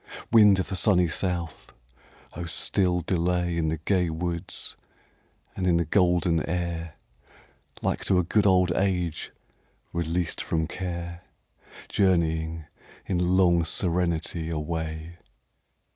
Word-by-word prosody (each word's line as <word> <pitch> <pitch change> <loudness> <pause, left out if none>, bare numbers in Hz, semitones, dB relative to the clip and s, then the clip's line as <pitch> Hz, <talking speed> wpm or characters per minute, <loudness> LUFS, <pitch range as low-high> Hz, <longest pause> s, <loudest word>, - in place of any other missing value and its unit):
Wind 105 -4 +7
of 95 - -2
the 95 - -2
sunny 90 -3 +3
south! 85 -2 -3 0.6
oh 85 - -5
still 90 +2 0
delay 90 0 0
In 80 -1 0
the 80 +1 -1
gay 90 +2 +1
woods 85 +2 -4 0.8
and 95 -1 -1
in 85 -2 +4
the 85 - +1
golden 85 -2 +2
air, 85 -2 -3 0.9
Like - - -1
to 95 - +3
a 90 - +3
good 105 +4 +2
old 90 -2 +4
age 90 -3 -1 0.6
released 85 +1 -1
from 80 -1 -1
care, 85 0 -5 0.7
Journeying, 80 -4 +1 0.4
in 90 0 +1
long 85 -2 +4
serenity, 85 -1 -1
away. 80 +1 -4
85 Hz, 115 wpm, -26 LUFS, 80-90 Hz, 0.9 s, Wind